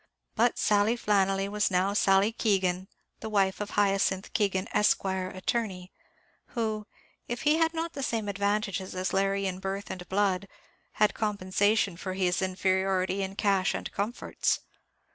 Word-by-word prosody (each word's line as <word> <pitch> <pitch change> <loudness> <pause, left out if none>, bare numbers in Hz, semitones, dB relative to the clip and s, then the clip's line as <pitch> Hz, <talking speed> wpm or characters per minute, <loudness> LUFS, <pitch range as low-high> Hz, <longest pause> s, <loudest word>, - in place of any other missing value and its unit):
But 235 +2 +2
Sally 210 +3 +2
Flannelly 195 -3 +1
was 210 +1 0
now 190 +1 +1
Sally 195 +1 +4
Keegan, 190 -5 0 0.3
the 220 - -5
wife 195 -2 +1
of 205 - -3
Hyacinth 195 -1 +1
Keegan, 195 -3 +1
Esq., 210 - +3
Attorney; 185 +1 -2 0.6
who, 220 -2 -2 0.4
if 240 - -4
he 305 +1 +4
had 325 0 +3
not 330 +1 -3
the 280 - -5
same 225 -5 -1
advantages 200 -1 -1
as 185 +1 -2
Larry 195 0 +1
in 185 -1 -2
birth 195 +1 -4
and 180 -1 -8
blood, 195 -1 +1 0.5
had 210 -1 +3
compensation 205 -1 +1
for 185 +1 -4
his 185 -1 +1
inferiority 190 0 0
in 195 0 -4
cash 195 -2 +2
and - - -5
comforts. 210 +5 -1
195 Hz, 145 wpm, -28 LUFS, 190-210 Hz, 0.6 s, Sally